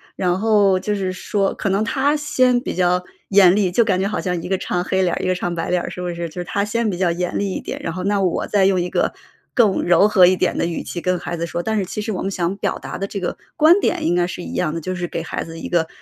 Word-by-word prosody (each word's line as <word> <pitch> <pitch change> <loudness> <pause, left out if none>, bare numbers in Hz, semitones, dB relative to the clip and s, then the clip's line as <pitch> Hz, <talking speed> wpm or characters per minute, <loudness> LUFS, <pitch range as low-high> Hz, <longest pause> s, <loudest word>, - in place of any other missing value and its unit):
然 180 0 0
后 205 -3 +3
就 210 +2 -2
是 190 -2 -2
说 195 +1 -1
可 205 - -2
能 195 +3 +1
他 285 +5 +1
先 255 -4 +2
比 - - -4
较 180 0 +2 0.3
严 190 -2 +6
厉， 195 -4 +1
就 235 +5 +4
感 185 -4 +1
觉 195 - 0
好 210 - -2
像 180 -2 -2
一 180 - -7
个 190 - +1
唱 180 -1 -2
黑 190 +1 0
脸 175 -2 +1
儿， - - -2
一 - - 0
个 185 - +1
唱 175 -1 -2
白 165 -1 -3
脸 180 0 +2
儿， - - -5
是 180 - -6
不 180 - -3
是？ 170 0 -4
就 180 +3 -6
是 - - -3
他 200 +3 -1
先 230 +1 0
比 180 - -3
较 180 -2 +1
严 180 +1 -2
厉 200 -1 -1
一 - - -4
点， - - -6
然 165 - -3
后 185 +1 -5
那 200 0 +1
我 180 - 0
再 200 -2 +3
用 190 -2 +3
一 175 - -2
个 - - 0 0.4
更 215 -7 +3
柔 175 +4 +5
和 190 -4 +6
一 185 +1 +4
点 185 - 0
的 - - +1
语 170 0 -3
气 175 - -5
跟 180 0 0
孩 175 -1 -5
子 170 - -2
说。 170 +1 -3
但 220 +3 -1
是 195 - 0
其 210 - -5
实 220 +1 -3
我 185 - -3
们 195 - -2
想 185 +1 -2
表 - - -2
达 - - -6
的 195 - -2
这 200 0 -5
个 180 - -3 0.2
观 325 +5 +6
点 - - 0
应 170 +2 +1
该 175 0 +2
是 180 0 -6
一 - - -7
样 155 - 0
的， 165 - -4
就 185 +3 -3
是 175 0 -3
给 - - -4
孩 - - -4
子 165 0 -9
一 - - -6
个 165 -2 +1
185 Hz, 335 characters per minute, -20 LUFS, 175-205 Hz, 0.4 s, 严